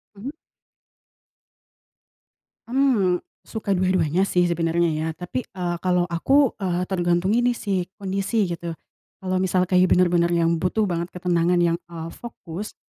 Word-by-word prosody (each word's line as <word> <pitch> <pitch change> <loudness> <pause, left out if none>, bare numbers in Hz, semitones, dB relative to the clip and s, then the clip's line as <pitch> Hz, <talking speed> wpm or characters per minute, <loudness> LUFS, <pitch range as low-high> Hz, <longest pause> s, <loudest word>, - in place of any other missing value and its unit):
Mhm? 225 +8 -6 2.4
Mmm. 240 -9 +3 0.2
Suka 210 -3 -3
dua-duanya 185 -2 +1
sih, 180 -2 +2
sebenarnya, 170 0 +1
ya. 155 +1 -2
Tapi, 180 +9 -3
eee, 180 -6 -4
kalau 180 -1 +2
aku, 260 +11 +2
eee, 180 -1 0
tergantung 175 +1 +1
ini 240 +1 +2
sih, 190 -3 -2
kondisi, 195 +2 0
gitu. 170 -2 -5 0.4
Kalau 185 -1 -3
misalnya, 185 0 +2
kayak, 185 0 +3
benar-benar 175 -1 +3
yang 170 -1 +1
butuh 210 +4 +1
banget 170 -1 -2
ketenangan 180 -1 +1
yang, 170 -1 +2
eee, 165 -1 -6
fokus, 210 -4 -8
180 Hz, 130 wpm, -23 LUFS, 170-195 Hz, 2.4 s, Mmm